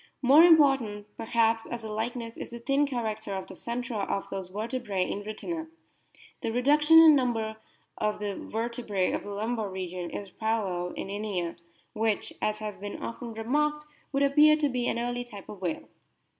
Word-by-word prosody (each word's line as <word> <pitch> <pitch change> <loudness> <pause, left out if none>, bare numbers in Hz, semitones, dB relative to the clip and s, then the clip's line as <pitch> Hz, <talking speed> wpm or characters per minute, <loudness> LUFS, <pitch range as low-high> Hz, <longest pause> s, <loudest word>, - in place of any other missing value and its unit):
More 280 +6 +8
important, 270 -11 +5
perhaps, 225 0 +1
as 235 -1 -5
a 220 - -5
likeness 230 +1 -3
is - - -7
the 235 - -7
thin 275 +4 +1
character 220 -6 -3
of 190 - -4
the - - -11
centra 235 +3 -4
of 195 - -2
those 190 -2 -4
vertebrse 210 -2 -2
in 200 - -3
Rhytina. 320 +10 -5 0.7
The 230 - -1
reduction 295 +6 +5
in 320 -2 +9
number 225 -5 0 0.4
of 210 0 0
the 205 -1 -3
ver 225 +2 -3
tebrae 215 -6 -1
of - - -1
the - - -9
lumbar 215 +1 -2
region 185 -2 -5
is 200 -2 -7
paralleled 190 -5 -2
in - - -4
Inia, 200 -4 -3 0.4
which, 220 -1 -1
as 215 0 0
has 215 -1 -6
been 205 +1 -6
often 230 -1 -6
remarked, 300 +6 0 0.3
would 275 0 +2
appear 300 +2 +6
to 300 -2 +1
be 245 -2 -1
an - - 0
early 245 +1 -2
type 205 -5 -11
of 200 -3 -10
whale. 175 -3 -3
225 Hz, 180 wpm, -28 LUFS, 205-250 Hz, 0.7 s, in